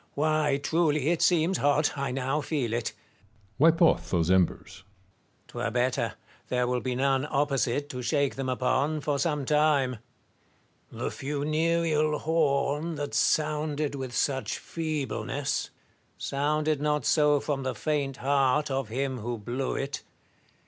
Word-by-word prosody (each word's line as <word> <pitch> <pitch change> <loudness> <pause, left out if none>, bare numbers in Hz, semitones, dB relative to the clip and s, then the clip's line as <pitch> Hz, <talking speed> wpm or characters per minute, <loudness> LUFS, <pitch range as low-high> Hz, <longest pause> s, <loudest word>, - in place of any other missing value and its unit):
Why, 150 -1 +2
truly, 150 -1 +2
it 170 - 0
seems 175 +1 +3
hot: 145 +1 +2
I 140 -1 -2
now 135 +3 -1
feel 140 -7 -2
it. 120 -1 -1
Metellus. - - -26 0.6
Wipe 165 +3 +5
off 165 - +3
those 85 -1 +1
embers. 95 -2 +3 0.3
Marius. 95 -2 -37
'Twere 115 - -3
better: 125 +2 0 0.3
there 125 -1 +1
will 125 0 0
be 125 -1 -2
none 135 +2 +1
opposite 140 -1 0
to 125 -2 -5
shake 140 +3 +1
them 135 -1 -3
upon, 130 +4 0
for 145 0 -1
some 150 -2 0
time. 145 -5 +2 0.9
Tlie - - -4
funereal 155 +2 0
horn, 150 0 0
that 145 -1 -4
sounded 150 -1 +1
with 130 -3 -5
such 135 0 0
feebleness, 155 -5 -3 0.5
sounded 150 +1 0
not 150 0 0
so 150 -2 +4
from 140 -1 -2
the 130 -1 -3
faint 145 -3 -1
heart 140 +1 +2
of 135 -4 -2
him 130 +2 -2
who 120 +2 -3
blew 120 +5 -3
it. 140 +1 -3
140 Hz, 140 wpm, -28 LUFS, 130-150 Hz, 0.9 s, Wipe